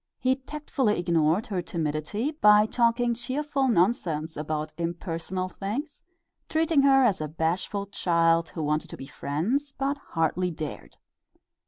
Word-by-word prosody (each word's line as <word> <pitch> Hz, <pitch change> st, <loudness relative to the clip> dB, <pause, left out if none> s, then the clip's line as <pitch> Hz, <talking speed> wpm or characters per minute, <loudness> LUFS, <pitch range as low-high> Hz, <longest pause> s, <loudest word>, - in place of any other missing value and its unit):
He 260 Hz, +1 st, +1 dB
tactfully 270 Hz, -5 st, -1 dB
ignored 170 Hz, +2 st, +2 dB
her 190 Hz, -4 st, -2 dB
timidity 165 Hz, -, -2 dB
by 210 Hz, -8 st, +5 dB
talking 235 Hz, +1 st, +2 dB
cheerful 275 Hz, +3 st, -1 dB
nonsense 175 Hz, -, +1 dB
about 155 Hz, +1 st, -3 dB
impersonal 170 Hz, +2 st, -3 dB
things, 220 Hz, -, -5 dB, 0.5 s
treating 320 Hz, -2 st, +3 dB
her 270 Hz, -1 st, +5 dB
as 205 Hz, -9 st, +2 dB
a 155 Hz, -, -2 dB
bashful 170 Hz, +6 st, -2 dB
child 165 Hz, -3 st, +2 dB
who 160 Hz, -, -5 dB
wanted 150 Hz, +1 st, -1 dB
to -, -, -8 dB
be 135 Hz, -, -8 dB
friends 190 Hz, -, -2 dB
but 275 Hz, +1 st, -1 dB
hardly 170 Hz, -, -1 dB
dared. 155 Hz, -3 st, -7 dB
190 Hz, 135 wpm, -27 LUFS, 165-255 Hz, 0.5 s, by